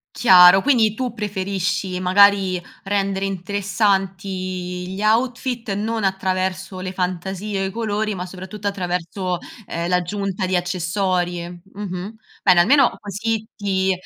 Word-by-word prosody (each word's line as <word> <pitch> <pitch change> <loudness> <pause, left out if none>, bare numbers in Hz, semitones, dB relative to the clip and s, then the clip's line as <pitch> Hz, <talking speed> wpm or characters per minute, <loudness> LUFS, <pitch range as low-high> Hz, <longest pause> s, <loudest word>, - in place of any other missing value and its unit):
Chiaro, 185 -3 +8
quindi 230 -7 +3
tu 250 0 -3
preferisci, 190 -3 -2
magari, 190 -1 +4 0.2
rendere 195 -1 -1
interessanti 195 0 -1
i 180 -1 -4
gli 195 - -5
outfit 240 +1 0
non 215 +2 -2
attraverso 190 0 -1
le 185 0 -4
fantasie, 190 +2 -3
o - - 0
i - - -5
colori, 215 0 -2
ma 180 -2 -5
soprattutto 190 +3 -7
attraverso, 180 -1 -2 0.3
ehm, 170 +1 -3
l'aggiunta 190 +2 -1
di 185 0 +1
accessori. 175 0 -1
Mh-mh. 190 +2 -7 0.3
Bene, 180 -2 +6
almeno 260 +7 +4
così 220 +2 -3
ti 190 -2 0
190 Hz, 125 wpm, -21 LUFS, 180-205 Hz, 0.3 s, Chiaro